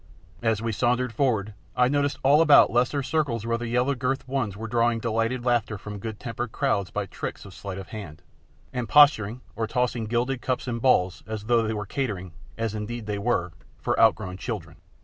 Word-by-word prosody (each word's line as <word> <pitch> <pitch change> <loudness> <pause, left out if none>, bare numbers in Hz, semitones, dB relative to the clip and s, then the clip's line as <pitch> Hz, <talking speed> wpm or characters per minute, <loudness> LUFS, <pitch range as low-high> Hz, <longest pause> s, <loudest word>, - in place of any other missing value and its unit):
As 110 -1 +1
we 115 - 0
sauntered 125 +2 +1
forward 110 -5 0 0.2
I 125 0 +4
noticed 145 +1 +1
all 145 +4 +6
about 155 -3 +7
lesser 125 +4 +1
circles 130 -7 -1
where 115 0 0
the 120 - -4
yellow 125 +4 +1
girted 135 +1 -2
ones 130 -7 -2
were 115 +1 -5
drawing 120 0 +2
delighted 115 +2 -1
laughter 120 -3 +1
from 105 +1 -7
good 110 0 -6
tempered 120 0 -4
crowds 105 -10 0
by 105 +3 -2
tricks - - -6
of - - -11
sleight 100 -2 -7
of 95 - -8
hand, 100 -9 -8 0.5
and 125 -3 -3
posturing, 125 -6 +5
or 115 -1 -1
tossing 125 -1 0
gilded 120 +3 -1
cups 130 0 -2
and 115 -2 -3
balls 95 -8 +3
as 110 -1 -4
though 115 +1 +3
they 110 0 -1
were 105 -1 -3
catering, 100 -7 -3 0.2
as 115 -2 -2
indeed 110 +2 -5
they 105 -1 -3
were, 100 -6 0 0.2
for - - -1
outgrown 90 0 +3
children. 90 -8 -5
115 Hz, 195 wpm, -26 LUFS, 105-125 Hz, 0.5 s, about